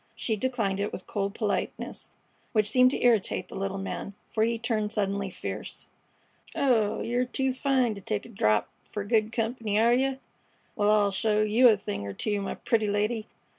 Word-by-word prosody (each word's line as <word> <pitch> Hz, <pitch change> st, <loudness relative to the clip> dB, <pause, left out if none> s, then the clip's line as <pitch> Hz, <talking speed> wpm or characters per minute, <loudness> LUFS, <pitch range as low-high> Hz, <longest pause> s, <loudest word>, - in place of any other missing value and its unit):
She 220 Hz, -, -1 dB
declined 220 Hz, -4 st, -1 dB
it 205 Hz, -, -1 dB
with 185 Hz, -, -7 dB
cold 200 Hz, 0 st, -2 dB
politeness, 210 Hz, -3 st, -3 dB, 0.4 s
which 215 Hz, -2 st, +3 dB
seemed 255 Hz, +3 st, +5 dB
to -, -, -3 dB
irritate 205 Hz, -5 st, +2 dB
the -, -, -9 dB
little 195 Hz, 0 st, -2 dB
man, 195 Hz, 0 st, -5 dB, 0.2 s
for 220 Hz, -, -1 dB
he 230 Hz, +1 st, +1 dB
turned 220 Hz, -2 st, -1 dB
suddenly 200 Hz, -2 st, -1 dB
fierce. -, -, -6 dB, 0.7 s
"Oh, 230 Hz, -6 st, +2 dB
yer 245 Hz, +2 st, +1 dB
too 265 Hz, +1 st, -1 dB
fine 260 Hz, -3 st, +1 dB
to 200 Hz, -, -9 dB
take 205 Hz, +1 st, -3 dB
a -, -, -11 dB
drap 105 Hz, -, +2 dB, 0.2 s
fer 210 Hz, -, -5 dB
good 215 Hz, +1 st, +1 dB
comp'ny, 225 Hz, -2 st, -1 dB
are 230 Hz, +2 st, +5 dB
yeh? 265 Hz, +2 st, +2 dB, 0.6 s
Wal, 205 Hz, 0 st, +2 dB
I'll 210 Hz, -1 st, +4 dB
show 210 Hz, +2 st, +2 dB
yeh 225 Hz, +4 st, +5 dB
a 215 Hz, -, +4 dB
thing 100 Hz, -, -5 dB
er 100 Hz, -, -5 dB
two, 205 Hz, -, -1 dB
my 195 Hz, -, -3 dB
pretty 220 Hz, -2 st, 0 dB
lady. 210 Hz, +2 st, 0 dB
215 Hz, 185 wpm, -28 LUFS, 200-235 Hz, 0.7 s, seemed